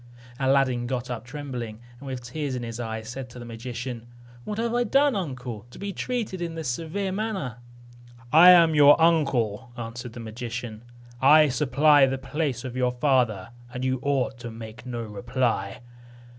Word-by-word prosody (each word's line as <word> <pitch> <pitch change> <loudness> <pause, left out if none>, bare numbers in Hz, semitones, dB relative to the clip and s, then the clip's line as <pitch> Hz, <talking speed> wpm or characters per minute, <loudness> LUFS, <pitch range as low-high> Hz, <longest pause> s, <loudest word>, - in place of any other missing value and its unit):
Aladdin 130 -2 +2
got 125 -1 -3
up 120 -1 -5
trembling, 125 -5 -6 0.2
and 140 - -10
with 130 -2 -5
tears 135 +2 -4
in 125 - -4
his 115 0 -6
eyes 110 -2 -5
said 125 +2 -6
to 125 - -12
the 120 - -8
magician, 120 0 -6 0.4
"What 210 - -4
have 230 +1 -1
I 245 0 +2
done, 275 +3 +3
uncle, 125 - -5
to - - -13
be 200 0 -5
treated 225 -7 -3
in 170 -1 -4
this 160 -5 -3
severe 170 +9 -3
manner?" 190 - -3 0.8
"I 170 +4 +9
am 170 -3 +7
your 145 +1 +7
uncle," 130 -8 +2
answered 120 +1 -6
the 120 - -8
magician; 115 0 -6 0.4
"I 150 +2 +7
supply 145 +1 +4
the 135 0 -1
place 135 -2 -3
of 125 -1 -6
your 125 -1 +1
father, 120 -7 +1 0.2
and 125 +1 -4
you 130 0 0
ought 135 -3 -1
to 120 - -6
make 110 +1 -10
no 120 -2 -4
reply. 110 -1 -2
130 Hz, 170 wpm, -25 LUFS, 120-150 Hz, 0.8 s, I